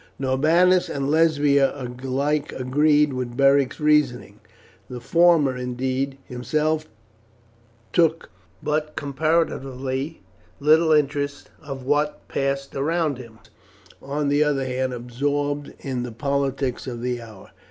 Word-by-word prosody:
Norbanus 160 +8 +3
and 140 0 -2
Lesbia 145 -4 +3
alike 135 +4 -2
agreed 145 +3 +2
with 125 -1 -4
Beric's 140 0 +3
reasoning; 150 -5 +1 0.5
the 125 -1 -6
former, 165 0 +3
indeed, 130 +2 -2
himself 155 +5 -1 1.1
took 165 -1 +2 0.3
but 150 0 -1
comparatively 140 -2 -2 0.4
little 160 +2 +4
interest 145 -1 0
in 135 -3 -7
what 150 +2 0
passed 140 0 -2
around 155 -1 0
him. 115 -3 -12 0.6
The - - -16
latter 140 - -6
was, 150 - -1
on - - 0
the 145 +1 +3
other 140 -3 0
hand, 130 0 -1
absorbed 145 +4 -2
in 130 -3 -4
the 120 -1 -5
politics 135 0 -2
of 120 -2 -5
the 125 -1 -2
hour. 110 -4 -13
140 Hz, 120 wpm, -23 LUFS, 130-150 Hz, 1.1 s, little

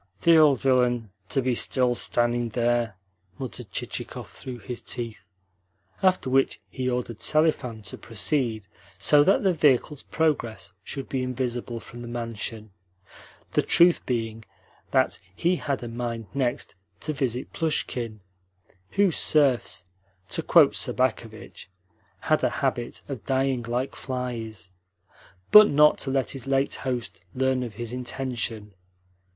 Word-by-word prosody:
"The 170 0 +6
old 150 -4 +6
villain, 125 -5 +2 0.2
to 135 - +1
be 125 0 +1
still 125 +1 +2
standing 120 0 +1
there!" 120 -2 0 0.4
muttered 125 -4 -7
Chichikov - - -5
through 130 -2 -8
his 120 +2 -6
teeth; 115 -4 -5 0.8
after 185 -7 +2
which 135 +1 +2
he 130 -1 -2
ordered 125 -3 -3
Selifan 150 -8 +2
to 100 - -6
proceed 115 -2 -1 0.3
so 145 +9 +5
that 195 - +3
the 190 -2 +3
vehicle's 150 -2 +2
progress 120 - -1
should 135 +4 -6
be 130 - -2
invisible 125 -2 -3
from 120 +2 -11
the 120 - -7
mansion 115 -2 -5 0.8
the - - +3
truth 175 0 +5
being 115 -2 -2 0.5
that - - +2 0.2
he 175 - +1
had 140 -6 -3
a - - -5
mind 115 -1 -4
next 130 -3 -2 0.3
to 155 - -2
visit 130 -3 -3
Plushkin 120 - -2 0.7
(whose 195 -5 +3
serfs, 135 - +3 0.4
to - - -1
quote - - +5
Sobakevitch, 115 -4 -2 0.5
had - - +1
a - - +3 0.2
habit 120 0 -2
of 130 -8 -6
dying 135 -1 +1
like 120 +3 -2
flies), 115 -6 -5 0.8
but 210 0 +10
not 150 +1 +5
to 135 - -1
let 135 -1 0
his 135 -2 -8
late 135 0 +1
host 125 -9 -4 0.2
learn 130 0 +1
of 120 -4 -6
his 120 +1 -4
intention. 120 -4 -4
125 Hz, 135 wpm, -25 LUFS, 115-135 Hz, 0.8 s, but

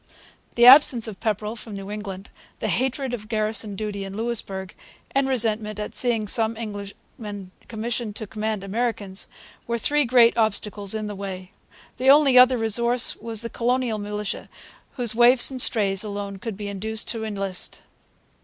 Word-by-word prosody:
The 240 - +5
absence 250 -3 +7
of 210 -3 -8
Pepperrell 215 0 -2
from 220 -2 -9
New 195 +1 -7
England, 200 -2 -7 0.3
the - - -3
hatred 265 0 -1
of 215 -3 -6
garrison 215 -2 0
duty 205 -1 -4
in 195 +1 -7
Louisbourg, 205 -5 -4 0.4
and 270 0 +1
resentment 220 -4 0
at 210 - -5
seeing 230 -4 +2
some 220 +1 +1
Englishmen 205 -1 -8 0.2
commissioned 225 -1 -4
to 220 - -6
command 215 -1 -4
Americans, 205 -2 -3 0.4
were 235 0 -1
three 290 +5 +1
great 235 -1 +5
obstacles 210 -2 -1
in 215 -1 -3
the 210 - -5
way. 190 -2 -7 0.5
The 260 +2 +2
only 280 -2 +6
other 250 0 +7
resource 235 +2 +1
was 225 0 -1
the 230 - -4
colonial 245 -2 -1
militia, 210 0 -5 0.4
whose 245 -5 -1
waifs 240 +2 +6
and 260 -1 -2
strays 200 -4 +3
alone 200 -1 -6
could 220 -1 -6
be 205 -1 -6
induced 215 +3 -3
to 225 -2 -4
enlist. 195 -4 -3
220 Hz, 160 wpm, -23 LUFS, 205-235 Hz, 0.5 s, absence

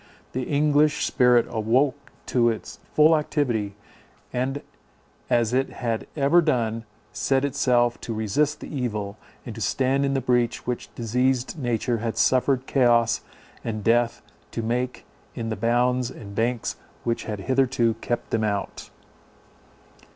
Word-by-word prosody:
The 130 0 -3
English 150 +1 +3
spirit 125 -3 +4
awoke 130 +6 0
to 120 -2 +3
its 110 - -5
full 155 +2 +6
activity, 120 -10 -1 0.6
and, 135 +3 -2 0.7
as 120 -1 +2
it 135 +1 +1
had 115 -3 -3
ever 145 +5 +5
done, 115 -7 0 0.3
set 135 +2 +1
itself 125 -3 +2
to - - -5
resist 110 +8 0
the - - -7
evil, 105 -5 -3 0.3
and - - -6
to - - -8
stand 135 +1 +1
in 140 0 +1
the - - +2
breach 125 -2 0
which 120 -4 -3
diseased 125 +5 0
nature 120 -2 0
had 115 0 -3
suffered 130 0 +2
chaos 120 -4 +3 0.4
and 110 -2 -4
death 115 +1 +2 0.3
to 115 - -4
make 125 +3 -2 0.3
in 115 -2 -3
the 110 - -2
bounds 125 +2 +1
and 100 -3 -10
banks 115 +2 -1 0.3
which 115 -1 -1
had 105 -3 -4
hitherto 130 0 +2
kept 120 - -3
them 110 -1 +1
out. 100 -2 -3
120 Hz, 140 wpm, -24 LUFS, 115-135 Hz, 0.7 s, full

